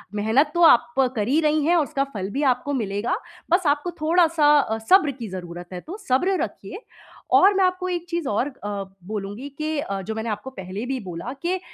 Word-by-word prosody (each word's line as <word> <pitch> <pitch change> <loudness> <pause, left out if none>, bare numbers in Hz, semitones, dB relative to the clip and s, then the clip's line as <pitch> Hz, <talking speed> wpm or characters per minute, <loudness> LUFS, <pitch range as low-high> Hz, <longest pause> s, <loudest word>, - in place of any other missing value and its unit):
मेहनत 225 +9 +2
तो 345 - 0
आप 320 -1 +6 0.2
कर 210 -2 -1
ही 285 +5 +3
रही 305 -1 +2
हैं 345 +2 +4
और 325 - +4
उसका 280 -1 -1
फल 195 -2 -4
भी 285 +3 -1
आपको 265 +4 -5
मिलेगा। 215 - -1 0.4
बस 350 -1 +3
आपको 295 +5 +1
थोड़-सा 315 -2 +4
अ, 220 -4 -1
सब्र 370 -7 +6
की 240 -4 -7
ज़रूरत 175 -1 -8
है, 180 - -6
तो 375 +6 -8
सब्र 360 +9 +2
रखिए 425 - -7 0.6
और 395 +2 +6
मैं 385 0 +2
आपको 365 0 0
एक 350 -1 -3
चीज़ 340 -4 -2
और 220 +6 0
अ, 205 -7 -5 0.2
बोलूँगी 210 +6 -5
कि 310 0 -2
अ, 195 -8 -3
जो 220 +3 -5
मैंने 220 +1 -3
आपको 210 +5 -4
पहले 195 -1 -6
भी 265 0 -2
बोला 185 +5 -6
कि 365 +2 -1
275 Hz, 210 wpm, -23 LUFS, 210-330 Hz, 0.6 s, आप